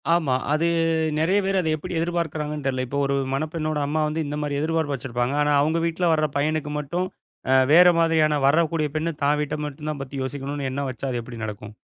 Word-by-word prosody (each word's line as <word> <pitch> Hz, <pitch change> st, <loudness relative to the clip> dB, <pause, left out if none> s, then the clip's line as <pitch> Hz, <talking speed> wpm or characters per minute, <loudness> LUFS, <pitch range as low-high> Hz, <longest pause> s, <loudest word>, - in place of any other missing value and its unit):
ஆமா. 155 Hz, -7 st, +2 dB, 0.2 s
அது 160 Hz, +2 st, +2 dB, 0.5 s
நெறைய 175 Hz, +6 st, +3 dB
பேர் 195 Hz, 0 st, +1 dB
அது 165 Hz, -3 st, 0 dB
எப்டி 165 Hz, +2 st, -5 dB
எதிர்பார்க்கிறாங்கனு 160 Hz, -4 st, -2 dB
தெரில. 130 Hz, -1 st, -1 dB
இப்போ 140 Hz, +3 st, -2 dB
ஒரு 140 Hz, 0 st, 0 dB, 0.2 s
மணப்பெண்ணோட 155 Hz, +1 st, -2 dB
அம்மா 155 Hz, +2 st, 0 dB
வந்து 155 Hz, +1 st, -2 dB
இந்த 145 Hz, +1 st, -4 dB
மாரி 145 Hz, -1 st, -2 dB
எதிர்பார்ப்பு 160 Hz, -2 st, 0 dB
வச்சுருப்பாங்க. 120 Hz, +1 st, -2 dB
ஆனா, 150 Hz, 0 st, +2 dB
அவங்க 160 Hz, +3 st, +1 dB
வீட்டுல 170 Hz, +1 st, 0 dB
வர்ற 155 Hz, -1 st, +2 dB
பையனுக்கு 150 Hz, +1 st, -1 dB
மட்டும் 170 Hz, +6 st, -2 dB, 0.4 s
அ -, -, +5 dB, 0.2 s
வேற 180 Hz, +2 st, +8 dB
மாதிரியான 160 Hz, -2 st, +3 dB
வரக்கூடிய 160 Hz, +1 st, +2 dB
பெண்ணு 160 Hz, +2 st, 0 dB
தான் 145 Hz, +1 st, +3 dB
வீட்ட 150 Hz, 0 st, -2 dB
மட்டும்தான் 150 Hz, 0 st, -5 dB
பத்தி 135 Hz, +1 st, -7 dB
யோசிக்கணும்னு 140 Hz, +1 st, -4 dB
எண்ணம் 140 Hz, 0 st, -2 dB
வச்சா, 130 Hz, +1 st, -6 dB
அது 120 Hz, -, -2 dB
எப்டி 115 Hz, -1 st, -8 dB
நடக்கும்? 105 Hz, 0 st, -7 dB
150 Hz, 190 wpm, -24 LUFS, 140-160 Hz, 0.5 s, வேற